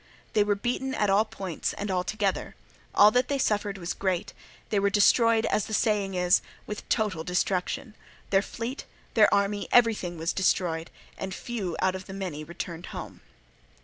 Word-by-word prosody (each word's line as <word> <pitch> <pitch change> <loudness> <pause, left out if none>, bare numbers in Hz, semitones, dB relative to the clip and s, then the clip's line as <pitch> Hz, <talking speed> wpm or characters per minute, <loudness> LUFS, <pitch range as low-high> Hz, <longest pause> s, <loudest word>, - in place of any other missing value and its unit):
They 210 - +4
were 205 0 +1
beaten 250 +5 -2
at 210 -2 +2
all 205 +3 +4
points 195 -6 -4
and 205 -1 -4
altogether; 190 +2 -1 0.4
all 210 +1 +8
that 250 +2 +2
they 280 - 0
suffered 205 -5 0
was 175 -2 -3
great; 185 -3 -2 0.4
they 205 - +3
were 200 0 +3
destroyed, 225 +2 +4
as 215 - +1
the 220 - -1
saying 205 -3 +1
is, 180 0 +4 0.2
with 210 - -5
a - - -17
total 205 -8 0
destruction, 180 +6 -1 0.4
their 195 0 +5
fleet, 235 +6 -5 0.3
their 215 -2 +5
army, 200 0 +1
everything 220 -8 +3
was 165 +2 -1
destroyed, 170 -3 0 0.3
and 190 -1 -4
few 205 -8 -4
out 190 0 +3
of 190 +1 -8
many 185 -6 -5
returned 170 +1 -6
home. - - -8
200 Hz, 170 wpm, -27 LUFS, 180-215 Hz, 0.4 s, all